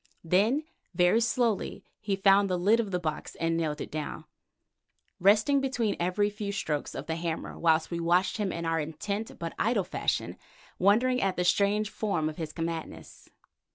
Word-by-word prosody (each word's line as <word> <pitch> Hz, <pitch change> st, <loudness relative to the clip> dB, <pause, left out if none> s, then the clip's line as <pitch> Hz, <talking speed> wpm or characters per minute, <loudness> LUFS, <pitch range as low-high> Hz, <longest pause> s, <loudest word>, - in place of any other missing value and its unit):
Then 210 Hz, -, +2 dB, 0.3 s
very 180 Hz, +5 st, +4 dB
slowly 230 Hz, -2 st, 0 dB
he 205 Hz, -2 st, -1 dB
found 195 Hz, 0 st, +4 dB
the 180 Hz, -, +1 dB
lid 205 Hz, +6 st, +3 dB
of 220 Hz, -3 st, -1 dB
the 180 Hz, -2 st, -1 dB
box 155 Hz, -3 st, -4 dB
and 165 Hz, 0 st, 0 dB
nailed 155 Hz, -2 st, -1 dB
it -, -, -6 dB
down, 155 Hz, -1 st, -5 dB, 0.9 s
resting 215 Hz, +9 st, +4 dB
between 245 Hz, -6 st, 0 dB
every 185 Hz, +4 st, +1 dB
few 205 Hz, -1 st, -4 dB
strokes 155 Hz, -7 st, -3 dB
of -, -, -5 dB
the 160 Hz, 0 st, -3 dB
hammer 165 Hz, -1 st, -4 dB
whilst 160 Hz, 0 st, +2 dB
we 170 Hz, -, -2 dB
watched 175 Hz, +5 st, +2 dB
him 205 Hz, -3 st, -1 dB
in 170 Hz, 0 st, -4 dB
our 165 Hz, 0 st, +1 dB
intent, 200 Hz, +8 st, -4 dB
but 165 Hz, -1 st, -5 dB
idle, 225 Hz, -3 st, +2 dB
fashion, -, -, -2 dB, 0.4 s
wondering 240 Hz, +7 st, +3 dB
at 195 Hz, -1 st, +1 dB
the 180 Hz, -, 0 dB
strange 205 Hz, +3 st, +2 dB
form 175 Hz, -8 st, -1 dB
of 155 Hz, -, -9 dB
his 160 Hz, -2 st, -4 dB
madness. 165 Hz, -1 st, -6 dB
190 Hz, 175 wpm, -28 LUFS, 165-210 Hz, 0.9 s, very